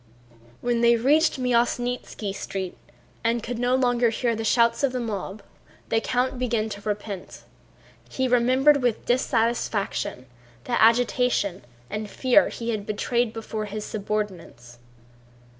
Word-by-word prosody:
When 240 Hz, -1 st, 0 dB
they 235 Hz, 0 st, +5 dB
reached 295 Hz, +7 st, +3 dB
the 260 Hz, -, -5 dB
Myasnítski 245 Hz, -3 st, 0 dB
Street 190 Hz, -2 st, -5 dB, 0.5 s
and 230 Hz, 0 st, +1 dB
could 240 Hz, 0 st, -4 dB
no 245 Hz, +1 st, +2 dB
longer 245 Hz, -2 st, +2 dB
hear 230 Hz, +1 st, 0 dB
the 225 Hz, -, -4 dB
shouts 235 Hz, +3 st, +3 dB
of 270 Hz, -2 st, +2 dB
the 255 Hz, -, -1 dB
mob, 210 Hz, -3 st, -5 dB, 0.5 s
the 225 Hz, -, +2 dB
count 250 Hz, +1 st, -1 dB
began 230 Hz, -3 st, 0 dB
to 205 Hz, -1 st, -7 dB
repent. 205 Hz, -2 st, -5 dB, 0.7 s
He 260 Hz, 0 st, -1 dB
remembered 260 Hz, +4 st, +4 dB
with 245 Hz, -3 st, 0 dB
dissatisfaction 230 Hz, -, 0 dB, 0.4 s
the 240 Hz, -, 0 dB
agitation 230 Hz, -, +2 dB, 0.2 s
and 210 Hz, -, -5 dB
fear 260 Hz, +6 st, +3 dB
he 235 Hz, 0 st, -4 dB
had 205 Hz, -2 st, -4 dB
betrayed 235 Hz, +2 st, 0 dB
before 220 Hz, -1 st, -5 dB
his 210 Hz, +1 st, -5 dB
subordinates. 195 Hz, -, -5 dB
235 Hz, 135 wpm, -25 LUFS, 210-245 Hz, 0.7 s, they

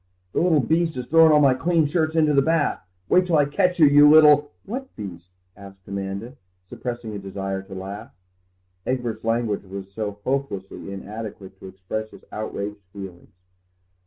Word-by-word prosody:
"The -, -, +1 dB
little 165 Hz, -4 st, +3 dB
beast 160 Hz, +4 st, +1 dB
has 125 Hz, -1 st, -4 dB
thrown 165 Hz, +2 st, +6 dB
all 150 Hz, -, +6 dB
my 140 Hz, -3 st, +5 dB
clean 165 Hz, +4 st, +1 dB
shirts 160 Hz, +1 st, 0 dB
into 155 Hz, -2 st, +3 dB
the 140 Hz, -, +5 dB
bath! 160 Hz, +1 st, +1 dB, 0.3 s
Wait 180 Hz, 0 st, +3 dB
till 170 Hz, -, +2 dB
I 145 Hz, -, +4 dB
catch 180 Hz, +5 st, +1 dB
you, 160 Hz, -, +7 dB
you 145 Hz, +1 st, +7 dB
little—" 150 Hz, -1 st, +7 dB, 0.2 s
"What 260 Hz, +6 st, -5 dB
little 100 Hz, -4 st, -5 dB
beast?" 85 Hz, +1 st, -22 dB, 0.3 s
asked 95 Hz, -1 st, -14 dB
Amanda, 100 Hz, +6 st, -5 dB, 0.3 s
suppressing 120 Hz, 0 st, -6 dB
a 100 Hz, -, -5 dB
desire 95 Hz, 0 st, -4 dB
to 95 Hz, 0 st, -11 dB
laugh; 95 Hz, +2 st, -7 dB, 0.8 s
Egbert's 120 Hz, -4 st, -2 dB
language 115 Hz, -3 st, 0 dB
was 95 Hz, 0 st, -8 dB
so 105 Hz, -1 st, -4 dB
hopelessly 125 Hz, -8 st, -3 dB
inadequate 100 Hz, -1 st, -8 dB
to -, -, -10 dB
express 95 Hz, +4 st, -5 dB
his -, -, -16 dB
outraged 105 Hz, -1 st, -5 dB
feelings. 95 Hz, -3 st, -10 dB
115 Hz, 170 wpm, -23 LUFS, 100-150 Hz, 0.8 s, you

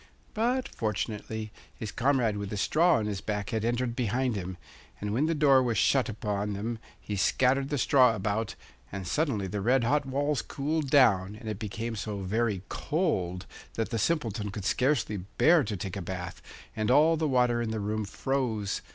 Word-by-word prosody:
But, 245 Hz, +4 st, 0 dB
fortunately, 110 Hz, 0 st, -3 dB, 0.2 s
his 110 Hz, -2 st, -5 dB
comrade 125 Hz, -5 st, +1 dB
with 100 Hz, -1 st, -4 dB
the 105 Hz, -, -4 dB
straw 165 Hz, -, +3 dB
on 110 Hz, -, 0 dB
his 100 Hz, -3 st, -3 dB
back 105 Hz, 0 st, -3 dB
had 110 Hz, -2 st, -1 dB
entered 120 Hz, +1 st, 0 dB
behind 125 Hz, +1 st, 0 dB
him, 95 Hz, -2 st, -5 dB, 0.4 s
and 105 Hz, 0 st, -3 dB
when 140 Hz, +7 st, +2 dB
the 165 Hz, -, +1 dB
door 140 Hz, -3 st, +5 dB
was 120 Hz, -4 st, 0 dB
shut 130 Hz, +5 st, +3 dB
upon 105 Hz, -1 st, -2 dB
them 110 Hz, +3 st, -3 dB, 0.2 s
he 105 Hz, -, -5 dB
scattered 130 Hz, +7 st, +2 dB
the 145 Hz, -, -1 dB
straw 125 Hz, -2 st, +5 dB
about, 105 Hz, +2 st, -2 dB, 0.4 s
and 95 Hz, -1 st, -5 dB
suddenly 135 Hz, -, 0 dB
the 100 Hz, +2 st, -3 dB
red 125 Hz, +4 st, +3 dB
hot 140 Hz, +4 st, +1 dB
walls 145 Hz, 0 st, 0 dB
cooled 150 Hz, +1 st, -2 dB
down, 105 Hz, -9 st, +4 dB
and 110 Hz, -, -10 dB
it 105 Hz, -2 st, -4 dB
became 115 Hz, +2 st, -4 dB
so 105 Hz, -1 st, -4 dB
very 105 Hz, 0 st, -1 dB
cold 95 Hz, -, -1 dB, 0.3 s
that 115 Hz, 0 st, -2 dB
the 115 Hz, -, -1 dB
Simpleton 110 Hz, -7 st, 0 dB
could 100 Hz, -1 st, -6 dB
scarcely 125 Hz, -5 st, +1 dB, 0.2 s
bear 165 Hz, -2 st, +5 dB
to 105 Hz, -5 st, -3 dB
take 90 Hz, +1 st, -5 dB
a 100 Hz, -, -4 dB
bath, 90 Hz, 0 st, -6 dB, 0.3 s
and 110 Hz, 0 st, -1 dB
all 155 Hz, +5 st, +5 dB
the 160 Hz, -1 st, 0 dB
water 125 Hz, -3 st, +2 dB
in 115 Hz, -, -2 dB
the 110 Hz, 0 st, -2 dB
room 105 Hz, +1 st, -2 dB
froze. 110 Hz, -2 st, -2 dB
115 Hz, 185 wpm, -28 LUFS, 105-135 Hz, 0.4 s, door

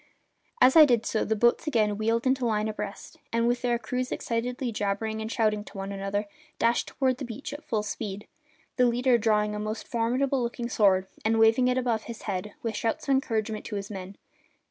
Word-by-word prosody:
As 260 Hz, -, +6 dB
I 320 Hz, -, +11 dB
did 240 Hz, -6 st, +3 dB
so 220 Hz, -, 0 dB
the 220 Hz, -, 0 dB
boats 240 Hz, +7 st, +2 dB
again 215 Hz, -7 st, +2 dB
wheeled 225 Hz, +3 st, 0 dB
into 260 Hz, 0 st, +2 dB
line 215 Hz, -2 st, +1 dB
abreast 210 Hz, -2 st, -6 dB
and, 230 Hz, 0 st, +1 dB
with 240 Hz, 0 st, +1 dB
their 240 Hz, -2 st, +1 dB
crews 250 Hz, +2 st, -3 dB
excitedly 245 Hz, +2 st, -2 dB
jabbering 215 Hz, +1 st, -2 dB
and 220 Hz, +1 st, -4 dB
shouting 215 Hz, -3 st, +1 dB
to 195 Hz, -1 st, -7 dB
each 195 Hz, -, -6 dB
other, 200 Hz, +1 st, -2 dB, 0.3 s
dashed 235 Hz, +1 st, +2 dB
toward 260 Hz, -2 st, 0 dB
the 285 Hz, -, -6 dB
beach 240 Hz, +3 st, -6 dB
at 295 Hz, +2 st, -8 dB
full 215 Hz, -6 st, -1 dB
speed, 210 Hz, -1 st, -5 dB, 0.5 s
the 250 Hz, -1 st, +5 dB
leader 245 Hz, 0 st, +3 dB
drawing 210 Hz, -1 st, +2 dB
a 210 Hz, -, -3 dB
most 215 Hz, +1 st, -4 dB
formidable 255 Hz, +3 st, 0 dB
looking 235 Hz, 0 st, -3 dB
sword 190 Hz, -5 st, +3 dB, 0.2 s
and 225 Hz, +1 st, +2 dB
waving 225 Hz, +3 st, +5 dB
it 250 Hz, 0 st, +1 dB
above 235 Hz, -4 st, 0 dB
his 235 Hz, -2 st, -8 dB
head, 200 Hz, 0 st, -4 dB
with 230 Hz, -2 st, -2 dB
shouts 230 Hz, +4 st, -2 dB
of -, -, +1 dB
encouragement 220 Hz, -5 st, 0 dB
to 210 Hz, -, -5 dB
his 200 Hz, +1 st, -5 dB
men. 195 Hz, 0 st, -7 dB
225 Hz, 205 wpm, -27 LUFS, 210-245 Hz, 0.5 s, I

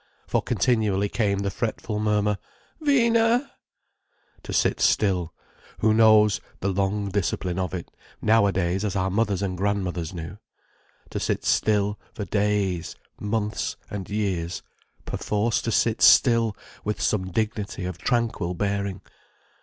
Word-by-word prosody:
For -, -, 0 dB
continually 105 Hz, -5 st, +1 dB
came 100 Hz, -3 st, 0 dB
the 100 Hz, 0 st, -1 dB
fretful 110 Hz, 0 st, -3 dB
murmur: 105 Hz, -1 st, +1 dB, 0.4 s
"Vina!" 235 Hz, -3 st, +3 dB, 0.9 s
To -, -, -8 dB
sit -, -, +1 dB
still—who 95 Hz, +3 st, 0 dB
knows 110 Hz, -2 st, +5 dB, 0.2 s
the 100 Hz, -, -1 dB
long 100 Hz, +1 st, 0 dB
discipline 95 Hz, -2 st, -1 dB
of 90 Hz, -1 st, -2 dB
it, 85 Hz, -, -7 dB, 0.3 s
nowadays, 95 Hz, -4 st, +2 dB
as 100 Hz, -2 st, -2 dB
our 95 Hz, 0 st, 0 dB
mothers 100 Hz, -1 st, 0 dB
and 95 Hz, -2 st, -2 dB
grandmothers 90 Hz, -4 st, -1 dB
knew. 85 Hz, +2 st, -7 dB, 0.7 s
To -, -, -2 dB
sit -, -, -1 dB
still, 105 Hz, -1 st, +2 dB, 0.2 s
for 105 Hz, -, -4 dB
days, 100 Hz, -5 st, 0 dB, 0.2 s
months, 105 Hz, 0 st, -2 dB, 0.2 s
and 100 Hz, -3 st, -5 dB
years—perforce 105 Hz, +3 st, -3 dB
to 115 Hz, -, -2 dB
sit 115 Hz, 0 st, +1 dB
still, 115 Hz, -4 st, +5 dB, 0.3 s
with 105 Hz, +1 st, -2 dB
some 95 Hz, -3 st, 0 dB
dignity 105 Hz, -2 st, -2 dB
of 90 Hz, -1 st, -5 dB
tranquil 115 Hz, -8 st, 0 dB
bearing. 100 Hz, 0 st, -2 dB
100 Hz, 120 wpm, -25 LUFS, 95-110 Hz, 0.9 s, knows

